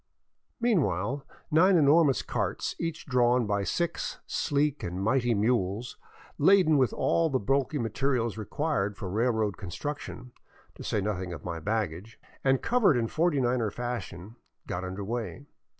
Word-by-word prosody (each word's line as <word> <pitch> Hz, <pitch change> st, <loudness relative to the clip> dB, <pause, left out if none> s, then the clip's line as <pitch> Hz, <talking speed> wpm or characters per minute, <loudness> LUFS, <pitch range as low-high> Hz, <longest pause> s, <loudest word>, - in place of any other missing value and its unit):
Meanwhile 140 Hz, -, +1 dB, 0.3 s
nine 180 Hz, +4 st, +5 dB
enormous 145 Hz, -3 st, +4 dB
carts, -, -, -2 dB
each 165 Hz, -1 st, -4 dB
drawn 125 Hz, -2 st, +3 dB
by 100 Hz, -1 st, 0 dB
six 170 Hz, -, -2 dB
sleek 145 Hz, 0 st, 0 dB
and 90 Hz, +1 st, -4 dB
mighty 120 Hz, +3 st, +2 dB
mules, 110 Hz, +1 st, 0 dB, 0.4 s
laden 160 Hz, -2 st, +5 dB
with 130 Hz, -, +3 dB
all 165 Hz, -1 st, +1 dB
the 135 Hz, -, +1 dB
bulky 135 Hz, +6 st, 0 dB
material 120 Hz, +1 st, 0 dB
required 105 Hz, -, -2 dB
for 95 Hz, -, -5 dB
railroad 110 Hz, -1 st, +1 dB
con 95 Hz, -, -7 dB
struction, 135 Hz, -, -6 dB, 0.4 s
to -, -, -10 dB
say 105 Hz, -, -1 dB
nothing 95 Hz, -3 st, -3 dB
of 80 Hz, -, -9 dB
my 85 Hz, -2 st, -4 dB
baggage, 105 Hz, +1 st, -3 dB, 0.2 s
and 135 Hz, -1 st, +2 dB
covered 230 Hz, -, +3 dB
in 115 Hz, -2 st, 0 dB
Forty 165 Hz, -3 st, +1 dB
niner 120 Hz, -3 st, +1 dB
fashion, 115 Hz, -3 st, -6 dB, 0.3 s
got 90 Hz, -, -4 dB
under 95 Hz, +2 st, -5 dB
way. 115 Hz, +1 st, -4 dB
120 Hz, 145 wpm, -28 LUFS, 100-145 Hz, 0.4 s, nine